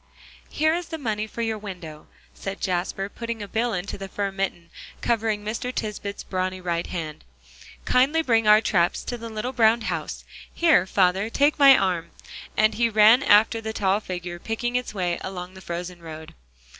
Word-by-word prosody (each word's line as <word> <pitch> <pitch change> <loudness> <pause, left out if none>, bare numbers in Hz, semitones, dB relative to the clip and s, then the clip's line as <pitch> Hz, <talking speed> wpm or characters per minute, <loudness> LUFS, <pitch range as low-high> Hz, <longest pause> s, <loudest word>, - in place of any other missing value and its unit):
"Here 315 +1 +2
is 345 0 -3
the 325 - -5
money 215 -6 -2
for 235 +2 -4
your 220 -1 -2
window," 175 -7 -9 0.3
said 195 0 -6
Jasper, 185 +1 -2
putting 230 +1 -5
a - - -7
bill 230 +4 0
into 195 0 -4
the 195 - -6
fur 200 0 -3
mitten, 190 -3 -4 0.3
covering 220 -3 0
Mr. 230 +3 -3
Tisbett's 210 -3 -4
brawny 185 0 -2
right 170 -2 -2
hand. 160 -4 -5 0.6
"Kindly 280 +6 +3
bring 225 -5 +2
our 210 +1 +7
traps 175 -5 +1
to 245 - -4
the 230 -1 -7
little 225 +4 -4
brown 230 -1 +4
house; 220 - -4 0.3
here, 325 - +3
father, 190 +2 +2
take 290 +5 +2
my 275 -1 +9
arm," 180 -3 -1 0.5
and 215 +1 +4
he 235 +1 +1
ran 220 +3 +6
after 225 -1 +4
the 220 0 -4
tall 195 -1 +1
figure, 180 -3 -6
picking 240 +5 -3
its 250 0 -1
way 180 -4 -2
along 185 -1 -6
the 190 - -12
frozen 175 0 -6
road. 160 -1 -9
210 Hz, 180 wpm, -24 LUFS, 185-230 Hz, 0.6 s, my